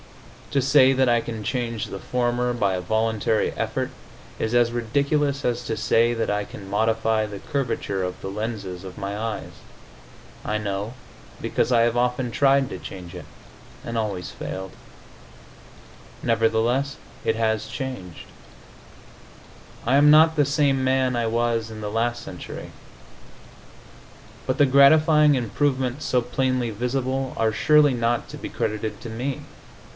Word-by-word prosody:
To 140 -2 +1
say 135 -1 +6
that 130 0 +2
I 120 -1 +3
can 115 -2 -6
change 115 -2 -2
the 100 - -7
former 125 +1 0
by 100 -5 +1
a 90 - -2
voluntary 110 +2 0
effort - - -2 0.5
is 110 - -1
as 120 -1 +4
ridiculous 140 +4 0
as 120 0 0
to 110 - -2
say 115 +1 +3
that 115 -1 -1
I 105 0 0
can 100 -1 -10
modify 110 +1 +1
the 100 -2 -7
curvature 115 -8 -2
of 90 0 -4
the - - -6
lenses 100 -3 -5
of 95 -1 -9
my 100 +1 -4
eyes. 110 0 -4 0.9
I 105 - -1
know, 105 +2 -3 0.4
because - - 0
I 120 -2 +5
have 115 0 +2
often 125 0 0
tried 135 +2 +3
to - - -5
change 90 -2 -9
it, 90 - -8 0.6
and 115 0 -3
always 100 -5 -3
failed. 95 0 -6 1.5
Nevertheless, 115 +4 +1 0.3
it 110 - +1
has 110 -1 0
changed. 125 - -6 1.6
I 125 +4 +3
am 145 +1 +6
not 160 +1 +6
the 145 -2 +3
same 140 -2 +2
man 130 -1 +2
I 120 -1 0
was 115 0 0
in 110 -1 -8
the 105 -1 -4
last 120 +2 -1
century. 90 - -8 1.8
But 130 - 0
the 145 - +6
gratifying 150 +2 +6
improvements 130 +2 -1
so 125 - +2
plainly 125 -1 -1
visible 130 +3 -2
are 110 -1 +1
surely 150 +3 +4
not 120 -1 0
to - - -8
be - - -6
credited 110 0 -3
to 115 - -7
me. 125 +5 -3
120 Hz, 150 wpm, -24 LUFS, 110-130 Hz, 1.8 s, say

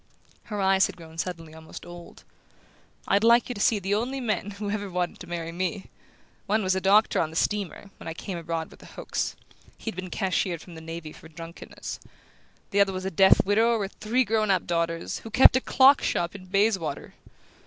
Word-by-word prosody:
Her 210 -3 -5
eyes 190 0 +4
had - - -10
grown 165 -1 -11
suddenly 165 -3 -4
almost 160 0 -11
old. 175 0 -12 0.8
"I'd 200 - +3
like 235 +2 +5
you - - -1
to 205 - -6
see 220 - +4
the 195 0 -2
only 245 +6 -1
men 215 -5 -1
who've 205 0 -4
ever 205 -2 -3
wanted 180 -1 -2
to 180 - -10
marry 170 -1 -4
me! 185 +3 -3 0.6
One 215 +1 +2
was 185 0 +2
the 190 - -1
doctor 205 +3 +4
on 155 - -1
the 160 - -11
steamer, 200 +1 -2
when - - -10
I 165 - -4
came 190 - -5
abroad 165 -1 -4
with - - -16
the - - -14
Hokes: - - -3 0.4
he'd 225 - -5
been 185 0 -6
cashiered 185 -2 -1
from 175 - -12
the 160 - -10
navy 165 -1 -7
for - - -14
drunkenness. 165 +1 -8 0.7
The 200 - +2
other 195 -1 +4
was 185 0 -4
a 190 - -2
deaf 190 +3 +5
widower 225 +4 +3
with 200 -2 -4
three 235 +4 +2
grown 215 -1 +1
up 190 -3 +2
daughters, 165 -1 -1
who 225 - -9
kept 250 +3 +7
a 260 - +3
clock 270 +2 +5
shop 170 0 -1
in 190 -2 -11
Bayswater! 195 -6 0
190 Hz, 205 wpm, -26 LUFS, 170-210 Hz, 0.8 s, kept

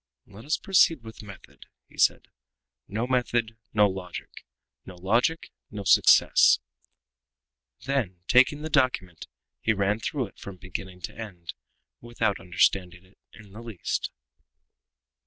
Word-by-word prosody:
"Let 105 +3 -14
us 155 - 0
proceed 165 -8 +3
with 110 0 -11
method," 100 -3 -14 0.2
he - - -17
said. - - +2 0.6
"No 110 +4 -2
method, 120 -3 0 0.2
no 105 -1 +4
logic; 95 -2 -7 0.5
no 95 - -11
logic, 115 - 0 0.2
no 105 -1 -7
success." 95 - +6 1.3
Then, 110 -11 -2
taking 130 +4 +4
the 155 - -4
document, 125 - 0 0.3
he 110 - +2
ran 100 +1 0
through - - -2
it - - -16
from 100 -2 -9
beginning 90 +1 -8
to - - -7
end, 95 -7 -8 0.5
without 115 -4 -2
understanding 90 0 0
it 95 - -27
in 105 -3 -16
the 110 +4 -10
least. 115 -6 -3
105 Hz, 130 wpm, -26 LUFS, 95-120 Hz, 1.3 s, success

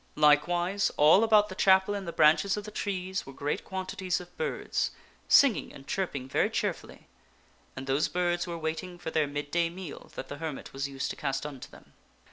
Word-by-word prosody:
Likewise 175 +6 +3
all 155 +8 +6
about 215 -2 +5
the 200 - -7
chapel 190 +1 +4
in 200 -1 -4
the 170 - -4
branches 160 +6 +4
of 210 - -4
the 210 - -8
trees 190 -2 -3
were 135 - -9
great 145 +2 -3
quantities 190 -1 -3
of 180 -1 -13
birds, 475 -1 -1 0.4
singing 275 -6 +5
and 135 - -13
chirping 145 -9 -3
very 135 - +1
cheerfully. - - -4 0.7
And 130 - -6
those 135 +4 +1
birds 175 0 0
were 170 -1 -4
waiting 165 +3 -4
for 175 -2 -6
their 155 -2 +1
mid 145 0 -5
day 170 -1 +2
meal 175 -2 -9
that - - -6
the 145 - -7
hermit 160 -4 -6
was 135 +1 -2
used 135 -1 -3
to - - -6
cast 135 -1 -2
unto 140 -4 -8
them. - - -17
175 Hz, 195 wpm, -29 LUFS, 145-190 Hz, 0.7 s, all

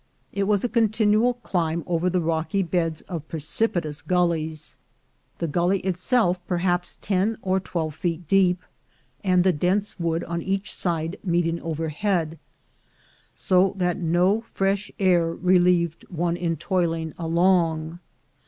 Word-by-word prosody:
It 200 0 0
was 205 -2 +2
a - - +2
continual 220 +1 +2
climb 170 -8 -2
over 175 +1 0
the 180 0 +1
rocky 165 +3 0
ON - - -5
TO 165 - -16
CALIFORNIA 175 -2 +2
36 - - -10
beds - - -32 0.2
of - - -35
precipitous 160 -1 -2
gullies, 160 -4 -1 0.6
the 170 - -2
gully 175 +5 +1
itself 185 +1 +1
perhaps 175 0 0
ten 205 +3 +1
or 190 0 +1
twelve 165 -4 -3
feet 170 0 -3
deep, 185 0 +3 0.6
and 180 -2 +3
the 185 -1 +3
dense 190 +6 0
wood 165 -1 0
on 170 0 -3
each 195 +3 -2
side 165 0 -2
meeting 170 -2 0
overhead, 165 +1 -2 1.0
so 185 +1 +2
that 180 -2 0
no 180 +6 +2
fresh 195 +1 0
air 175 -4 +3
relieved 175 -2 +2
one 170 0 -1
in 170 -2 -2
toiling 165 -1 -1
along. 165 -1 +1
175 Hz, 145 wpm, -24 LUFS, 165-190 Hz, 1.0 s, deep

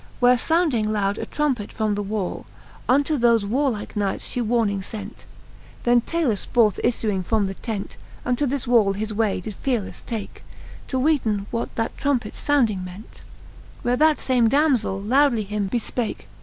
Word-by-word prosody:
Where 245 0 +6
founding 255 -6 +1
loud 200 -1 0
a - - -4
trumpet 265 -9 -1
from 215 -1 0
the 205 - -1
wall. 205 -2 -3 0.4
Unto 285 +3 +3
thofe 235 -2 +4
warlike 235 0 -1
knights 200 -2 -1
fhe 250 - -2
warning 215 -4 +1
fent. 205 +2 -8 0.6
Then 240 0 +4
Talus 270 - 0
forth 220 -5 +3
iffuing 215 -5 0
from 215 +2 +1
the 195 - -3
tent, 210 0 -5 0.3
Unto 250 +4 +1
the 265 -1 -2
wall 225 -5 +4
his 215 +2 -3
way 210 -3 +1
did 210 +4 -6
fearelefle 240 -7 -2
take. 225 -4 -6 0.4
To 260 - -2
weeten 255 -8 +1
what 230 - -3
that 225 - -2
trumpets 260 -6 -1
founding 230 -10 +2
ment: 185 +4 -11 0.6
Where 245 +1 +2
that 310 +3 +4
fame 245 -3 +2
damzell 265 -8 +2
lowdly 260 -3 +3
him 205 -1 -2
befpake. 235 +1 -3
230 Hz, 160 wpm, -23 LUFS, 205-255 Hz, 0.6 s, Where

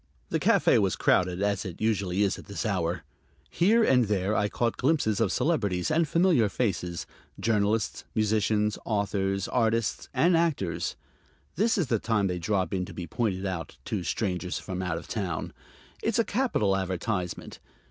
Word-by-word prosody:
The - - 0
café - - +4
was - - +1
crowded, 90 +1 +2
as 100 -2 0
it 90 -3 -7
usually 100 -3 +1
is 100 - 0
at - - -13
this 100 +3 -4
hour. 90 -5 -1 0.5
Here 220 +7 +4
and 125 - +4
there 100 0 0
I 105 -1 +1
caught 115 +1 0
glimpses 130 -7 +1
of - - +2
celebrities 100 - 0
and 160 +1 +2
familiar 165 - +3
faces: 90 -7 -2 0.3
journalists, 110 0 0
musicians, 105 0 +1
authors, 100 -2 -1
artists 115 -2 0
and 175 +1 +3
actors. 100 - 0 0.6
This 220 +6 +2
is 180 - +2
the 120 -4 0
time 110 -3 +1
they 90 -2 -1
drop 95 +2 0
in 95 -1 0
to - - -11
be 90 - -5
pointed 100 -2 -2
out 85 -7 -4
to 100 -4 -2
strangers 90 -3 -2
from 95 0 -5
out 90 -3 -2
of - - -9
town. 95 -7 -3 0.5
It's 225 0 0
a 230 - +3
capital 205 - +1
advertisement. 95 0 -3
105 Hz, 165 wpm, -27 LUFS, 95-115 Hz, 0.6 s, café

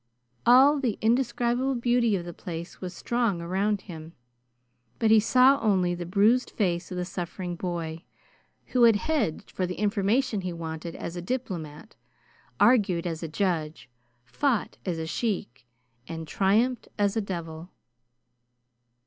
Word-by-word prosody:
All 270 +4 +7
the 245 -6 -1
indescribable 245 +2 +1
beauty 240 -2 +2
of 175 -2 -4
the 175 - -7
place 170 0 -8
was 180 -1 -4
strong 230 0 -1
around 190 +4 -1
him, 165 -3 -10 0.8
but 220 -1 +2
he 220 - +8
saw 255 +5 +5
only 190 -5 +2
the 175 -1 -5
bruised 215 +7 +3
face 175 -4 -1
of 180 - -5
the 180 - -2
suffering 175 0 -5
boy, 170 -2 -4 0.6
who 250 - +1
had 230 -2 +6
hedged 225 - -1
for 185 - -2
the 180 - -4
information 210 +2 +1
he 180 -1 -4
wanted 165 0 -6
as 170 - -6
a 175 - -4
diplomat, 180 - -5 0.6
argued 200 -9 +4
as 165 -2 -3
a 165 - -3
judge, 155 -7 -2 0.3
fought 240 - -1
as 175 -3 -1
a 160 - -3
sheik, 160 - -3 0.4
and 160 -1 -6
triumphed 220 +9 +1
as 205 0 +1
a 225 - +1
devil. 170 -3 -6
190 Hz, 145 wpm, -27 LUFS, 170-235 Hz, 0.8 s, he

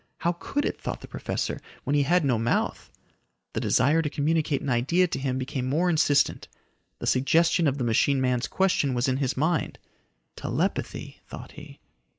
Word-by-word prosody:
How 170 - +1
could 190 +11 -3
it, - - -3
thought - - -4
the - - -10
professor, - - -3 0.2
when 145 - 0
he 145 - +4
had 165 +3 +2
no 125 -5 +2
mouth. 115 +1 -1 0.6
The - - -1
desire 150 +6 +3
to 150 - -2
communicate 150 0 0
an 140 - -3
idea 140 +10 +3
to 150 - -3
him 130 -1 -1
became 130 -1 -3
more 170 +6 +2
insistent. 155 -3 +2 0.5
The - - -6
suggestion 165 +5 +3
of 140 0 0
the 130 - -2
machine 120 +4 +2
man's 125 -2 0
question 180 -8 +1
was 120 +2 +1
in 130 0 +1
his 135 -2 -1
mind. 160 +2 0 0.6
Telepathy, - - -3
thought - - -9
he. - - -12
140 Hz, 175 wpm, -26 LUFS, 130-165 Hz, 0.6 s, he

